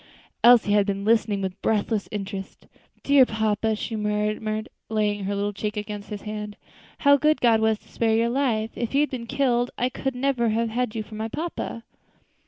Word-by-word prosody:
Elsie 235 -3 +7
had 205 -1 +3
been 200 0 -2
listening 215 -3 +2
with 190 +1 -5
breathless 215 -1 0
interest. 195 -2 -6 0.4
"Dear 280 -1 +6
papa," 220 -1 0
she 225 +2 -4
murmured, 215 +1 -1 0.2
laying 210 -2 0
her 200 +1 -1
little 205 +1 -1
cheek 210 +2 -4
against 210 0 -5
his 210 -2 -6
hand, 210 -1 -6 0.4
"how 285 0 +6
good 305 +2 +2
God 230 -2 +4
was 220 0 +2
to - - -26
spare 225 -1 +1
your 230 +1 +2
life! 235 -4 0
If 235 +2 -3
you 280 - +5
had 295 - 0
been 240 -3 -5
killed 250 -3 +1
I 250 - +1
could 265 0 -3
never 250 -3 +1
have 225 +1 0
had 235 0 -2
you 220 - -2
for 210 - -15
my 220 +1 -3
papa." 295 -4 -5
220 Hz, 190 wpm, -24 LUFS, 210-240 Hz, 0.4 s, Elsie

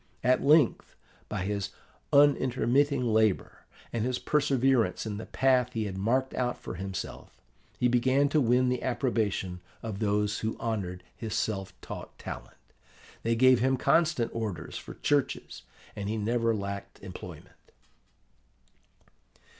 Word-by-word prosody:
At 130 +1 +3
length, 150 -3 +3 0.3
by 100 -4 -2
his 100 -1 -2 0.4
unintermitting 140 -1 +3
labour 110 -3 +1 0.3
and 120 +2 -1
perseverance 135 -9 +2
in 105 -2 -4
the 110 - -7
path 125 -2 +2
he 110 -2 -1
had 95 -2 -4
marked 125 +7 0
out 125 -1 -1
for - - -7
himself, 95 +1 -6 0.4
he 125 - +3
began 130 +3 +3
to 150 +1 +3
win 125 +1 +3
the 125 -1 -1
approbation 110 -8 -1 0.2
of 110 -3 -4
those 105 0 +1
who 110 0 -2
honoured 95 -6 -3
his 110 -3 -4
self 95 -3 -2
taught - - -8
talent. - - -8 0.6
They 115 0 +1
gave 130 +1 +6
him 130 +2 +2
constant 155 -4 +2
orders 105 -8 -4
for - - -7
churches, 140 - -1 0.3
and 100 0 -4
he 110 - -1
never 115 +1 +1
lacked 100 -1 -5
employment. - - -10
115 Hz, 130 wpm, -29 LUFS, 105-130 Hz, 0.6 s, gave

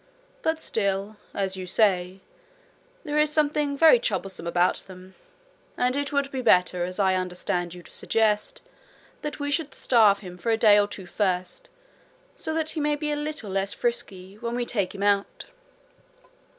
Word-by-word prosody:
But 320 -6 0
still, 200 -4 -1
as 195 -1 -2
you 185 -1 -6
say, 185 -2 +1 0.8
there 300 -2 -1
is 300 0 +3
something 295 -2 +1
very 325 - +7
troublesome 195 - -3
about 175 +1 +2
them; 185 0 -9 0.6
and 250 +1 +1
it 285 0 -2
would 280 -1 0
be 265 - -3
better, 180 -5 +3
as 185 +2 -6
I 190 -2 +3
understand 180 -1 -2
you 175 - -11
to - - -14
suggest, 220 - 0 0.6
that 300 0 -5
we 285 0 -2
should 295 -2 -1
starve 215 -5 +4
him 180 -2 -10
for 230 - -3
a 225 - +3
day 210 -2 +6
or 205 - +2
two 200 -2 -8
first, 185 - -2 0.7
so - - -4
that 315 -1 0
he 315 - -4
may 295 0 +1
be 300 0 -3
a - - 0
little 295 -8 -4
less 195 +1 -1
frisky 200 -5 -4
when 235 0 -3
we 245 0 -1
take 205 -5 -2
him 200 - -4
out.' 200 -1 0
210 Hz, 175 wpm, -25 LUFS, 190-285 Hz, 0.8 s, very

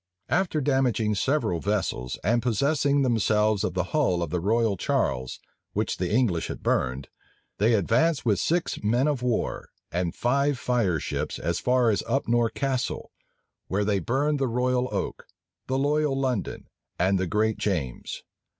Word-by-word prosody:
After 160 +1 +1
damaging 130 -6 +1
several 105 - 0
vessels, 95 -11 -2
and 120 +3 +2
possessing 140 +4 +2
themselves 110 -3 +2
of - - -2
the 90 - +1
hull 110 - +2
of 80 - -5
the 90 - 0
Royal 110 +3 +1
Charles, 65 -7 -1 0.3
which - - -1
the 90 -1 -2
English 105 -8 +1
had - - -7
burned, 65 +2 0 0.5
they 110 +3 +4
advanced 125 - +2
with 105 -5 +2
six 170 - -1
men 120 +7 +2
of 145 -4 0
war 125 -3 -1 0.2
and 85 -1 -1
five 140 +3 +1
fireships 110 - -1
as 85 +2 -2
far 125 -2 +3
as 100 - 0
Upnore 120 -3 +1
Castle, 130 -1 -2 0.6
where 100 +2 0
they 100 -1 +1
burned 140 - 0
the 135 - +1
Royal 125 +1 0
Oak, 100 -3 -4 0.4
the 130 - 0
Loyal 145 0 +1
London, 130 -6 -2 0.3
and 95 +2 +2
the 95 - -1
Great 110 +3 0
James. 75 - -3
115 Hz, 150 wpm, -26 LUFS, 95-135 Hz, 0.6 s, they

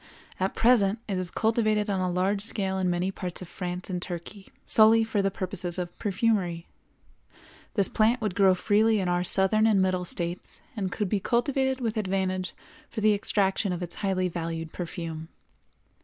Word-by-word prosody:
At 190 +1 -1
present 225 -3 +4
it 195 -3 -1
is 180 -1 -1
cultivated 215 -1 +1
on 195 -2 0
a 185 - 0
large 190 +3 0
scale 195 -3 -2
in 185 -1 +1
many 180 +2 0
parts 180 -2 -5
of - - -10
France 180 0 -5
and 185 - -3
in - - -3
Turkey, 180 +3 -7 0.2
solely 225 +1 +6
for 220 -2 0
the 195 - +1
purposes 185 -2 -2
of 175 -1 -4
perfumery. 195 -5 0 1.1
This 200 -4 +3
plant 225 +3 +2
would 210 -4 -2
grow 190 -1 +4
freely 215 +3 +3
in 185 - -1
our 175 0 +1
Southern 195 +4 +3
and 210 -3 +4
Middle 185 -1 +1
States, 175 0 -4 0.2
and 195 -4 -2
could 210 +1 -1
be 205 +2 0
cultivated 265 +4 0
with 225 -2 -1
advantage 185 -2 -1 0.3
for 225 - -5
the 215 0 +4
extraction 200 -1 +1
of 180 0 -3
its 175 - -4
highly 190 -2 +1
valued 165 -2 -4
perfume. 165 -2 -5
190 Hz, 180 wpm, -27 LUFS, 180-215 Hz, 1.1 s, solely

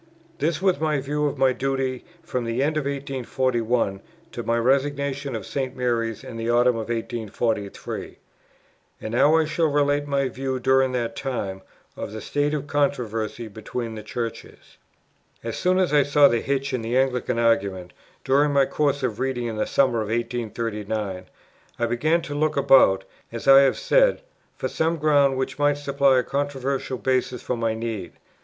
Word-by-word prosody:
This 165 +2 -1
was 185 -5 +3
my 155 -2 +1
view 150 +2 -1
of 145 - -4
my 130 -1 +3
duty 135 -1 -2 0.2
from 125 -6 -3
the 115 +3 -1
end 155 +2 0
of 155 -2 -1
1841, 125 -6 -1 0.3
to 120 - -5
my 115 0 0
resignation 140 +1 0
of 110 -4 -5
St. 130 -2 -3
Mary's 115 -2 -1
in 130 -3 -8
the 115 +1 -3
autumn 120 +1 +4
of 115 -1 -5
1843. 115 -2 -3 0.8
And 110 - -6
now 145 +6 +4
I 160 - +3
shall 160 +1 +1
relate 145 0 +1
my 140 -1 +1
view, 130 +1 -3
during 130 +1 +3
that 115 -2 -2
time, 100 -8 -4 0.3
of - - -6
the 110 - -5
state 145 +5 -1
of 145 - -3
the - - -15
controversy 120 -6 -1
between 110 +2 -5
the 110 - -7
Churches. 115 +2 -7 0.6
As 115 0 -4
soon 185 0 +1
as 185 -5 +1
I 145 - +6
saw 145 +1 +5
the 120 - +1
hitch 140 0 -2
in 125 - -1
the 115 +3 -1
Anglican 130 -3 0
argument, 100 -6 0 0.3
during 145 +2 +3
my 140 -1 +4
course 145 -1 0
of 115 -5 -2
reading 130 -2 -1
in 115 -2 -4
the 110 - -1
summer 130 -5 +2
of 105 - -3
1839, 110 -4 -3 0.5
I 120 - 0
began 155 +8 +1
to 145 - -6
look 150 0 0
about, 130 -9 +5 0.3
as 115 +2 -6
I 135 0 +9
have 135 -2 +3
said, - - +3 0.3
for - - -3
some 165 +1 0
ground 145 -3 +3
which 130 +1 -3
might 145 0 +3
supply 140 -2 +2
a 125 - +2
controversial 140 -1 -2
basis 130 -1 -1
for 125 - -2
my 115 -1 -1
need. 110 -7 -5
130 Hz, 175 wpm, -24 LUFS, 115-140 Hz, 0.8 s, I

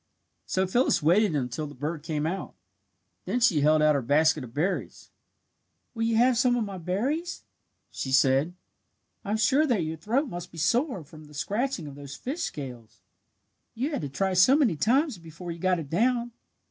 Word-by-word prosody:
So 190 0 +1
Phyllis 240 - +2
waited 180 +2 +3
until 135 +2 -2
the 145 - -11
bird 150 +4 -4
came 155 -1 -2
out. 180 +4 -4 0.7
Then 245 - -1
she 185 -11 +3
held 155 +1 +4
out 155 0 +5
her 140 - 0
basket 150 +3 +2
of 120 - -10
berries. 160 +9 -3 0.8
"Will 225 - -5
you 225 0 +1
have 240 +1 +4
some 250 -2 +3
of 240 - 0
my 195 -3 -6
berries?" 265 - -2 0.5
she 130 - -4
said. 135 +5 +3 0.7
"I'm 210 +2 -1
sure 270 +9 +3
that 225 - +1
your 160 +1 -4
throat 235 - 0
must 175 -5 -7
be 165 - -13
sore 230 - +1
from 155 +1 -14
the 150 0 -15
scratching 205 - -2
of 145 - -8
those 140 -1 -9
fish 290 +7 -5
scales. 125 - -6 0.8
You 265 +7 -2
had 290 - -2
to 145 - -4
try 190 +7 -1
so 185 +9 +6
many 265 - +3
times 255 - +1
before 170 +1 -8
you 170 - -7
got 185 +1 +2
it 155 -4 -7
down. 240 +5 +1
180 Hz, 185 wpm, -27 LUFS, 150-235 Hz, 0.8 s, so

